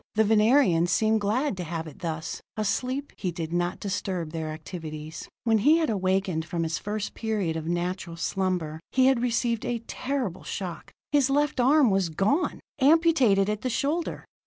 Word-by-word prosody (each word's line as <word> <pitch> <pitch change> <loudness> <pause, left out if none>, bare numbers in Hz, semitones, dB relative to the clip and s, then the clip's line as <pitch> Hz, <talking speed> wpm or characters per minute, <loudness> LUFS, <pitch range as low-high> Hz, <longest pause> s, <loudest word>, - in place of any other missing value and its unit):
The 220 - +5
Venerians 215 -5 +4
seemed 220 +3 +2
glad 225 +5 0
to 180 - -3
have 165 -1 -4
it 155 - -11
thus: 160 -2 -4 0.2
asleep, 255 +6 -1
he 185 -3 -2
did 165 -1 -5
not 175 +1 -1
disturb 185 -5 -3
their 160 -1 -4
activities. 155 -1 -7
When 225 -2 +3
he 300 +10 +5
had 320 -7 +1
awakened 190 -4 0
from 170 +1 -2
his 160 -1 -2
first 210 0 -4
period 210 -7 -1
of 160 0 -4
natural 175 0 -2
slumber, 175 -3 -2
he 260 0 +4
had 265 -3 +4
received 235 -2 0
a 235 -2 -2
terrible 255 -10 -3
shock. 180 -4 -6 0.2
His 285 -2 +3
left 290 -1 +1
arm 265 -1 +5
was 190 -3 +1
gone, 200 - 0 0.2
amputated 275 - +4
at 210 0 -2
the 255 - -1
shoulder. 295 +8 -1
200 Hz, 170 wpm, -26 LUFS, 170-250 Hz, 0.2 s, The